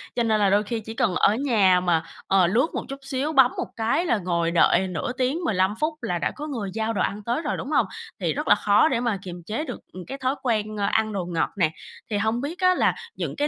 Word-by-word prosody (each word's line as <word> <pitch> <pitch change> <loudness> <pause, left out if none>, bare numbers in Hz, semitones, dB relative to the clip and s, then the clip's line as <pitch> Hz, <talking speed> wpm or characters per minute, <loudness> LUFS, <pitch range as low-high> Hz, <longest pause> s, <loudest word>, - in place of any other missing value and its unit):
cho 240 - +1
nên 220 -2 +2
là 200 -2 +3
đôi 205 +2 +3
khi 225 +2 -3
chỉ 220 +1 -8
cần 225 -8 0
ở 210 - +4
nhà 210 -9 +3
mà, 170 -3 +1 0.2
ờ, 190 -2 +4
lướt 240 - +2
một - - -3
chút 275 0 -6
xíu, 275 +3 -2
bấm 265 -3 +6
một - - -2
cái 230 +10 0
là 235 - +2
ngồi 170 -3 -1
đợi 175 +2 +4
nửa 180 +5 -3
tiếng, 260 +6 0
15 190 - +1
phút 310 +1 0
là 175 - -1
đã - - -1
có 300 +1 -6
người 225 -9 -4
giao 225 0 -1
đồ - - -1
ăn 205 +1 -2
tới 240 +8 -1
rồi, 300 - -2
đúng 265 - -6
hông? - - +3 0.3
Thì - - 0
rất - - -4
là - - +7
khó 205 +8 +4
để 255 -6 0
mà 235 -5 0
kiềm 175 -2 -8
chế 225 +8 -3
được, - - -6
ừm, 185 -1 -8
cái 270 +2 -5
thói 260 +1 -1
quen, 215 -3 -1
a, 200 - +1
ăn 220 -1 +1
đồ 185 -3 -2
ngọt 170 -2 -1
nè. 160 -4 +2 0.4
Thì 205 - +1
hông 220 +4 0
biết 315 +6 -5
á 365 0 +4
là - - +2 0.2
những - - -4
cái 295 0 0
220 Hz, 270 wpm, -24 LUFS, 190-265 Hz, 0.4 s, là